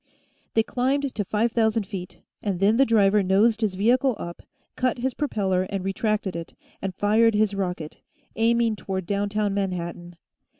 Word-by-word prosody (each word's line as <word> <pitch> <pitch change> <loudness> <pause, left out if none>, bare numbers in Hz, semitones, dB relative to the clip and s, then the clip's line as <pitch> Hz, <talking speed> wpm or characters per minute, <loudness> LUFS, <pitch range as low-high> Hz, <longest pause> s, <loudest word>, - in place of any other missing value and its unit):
They 225 - +4
climbed 265 +3 -1
to 210 - -1
five 215 +4 0
thousand 220 -2 +1
feet, 185 -3 -8 0.2
and 195 -4 -2
then 205 +4 +3
the 270 - +4
driver 210 -2 +4
nosed 210 +4 +3
his 205 -4 0
vehicle 245 +5 +2
up, 170 0 -7 0.3
cut 255 -1 0
his 255 +1 -1
propeller 190 -10 0
and 195 -2 -3
retracted 200 -1 -1
it, 170 -1 -7 0.3
and 190 -2 -4
fired 220 +2 +3
his 210 -1 +2
rocket, 180 -5 -4 0.3
aiming 230 -1 +2
toward 190 -2 -4
downtown 205 +1 -1
Manhattan. 175 -3 -4
205 Hz, 160 wpm, -25 LUFS, 190-230 Hz, 0.3 s, They